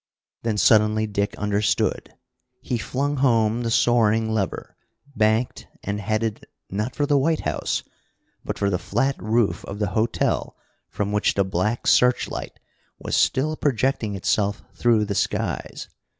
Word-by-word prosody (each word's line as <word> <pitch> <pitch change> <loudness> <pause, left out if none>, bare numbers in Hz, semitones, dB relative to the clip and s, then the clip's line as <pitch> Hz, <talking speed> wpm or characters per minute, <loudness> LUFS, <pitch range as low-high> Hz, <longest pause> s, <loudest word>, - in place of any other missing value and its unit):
Then 110 -2 -1
suddenly 110 0 +4
Dick 100 -1 -2
understood. 105 0 0 0.4
He 125 -2 -3
flung 140 +5 -2
home 115 -3 +2
the 115 - -1
soaring 115 -1 +3
lever, 105 -4 -3 0.4
banked, 110 +2 +1 0.2
and 100 +1 -3
headed, 110 +1 -2 0.2
not 105 +6 -3
for 145 - +1
the 145 -1 +3
White 160 +3 +1
House, - - -2 0.6
but - - -4
for 100 -1 0
the 90 - 0
flat 135 +6 0
roof 110 +2 +1
of 100 - -6
the 105 -2 -1
hotel 110 +4 -1 0.3
from 100 0 -2
which 105 0 +1
the 100 - +2
black 95 +5 -1
searchlight 125 0 +2 0.4
was - - -3
still 155 +4 +2
projecting 130 -6 0
itself 100 +2 0
through 115 -3 +2
the 100 - -2
skies. - - -2
110 Hz, 140 wpm, -23 LUFS, 105-120 Hz, 0.6 s, suddenly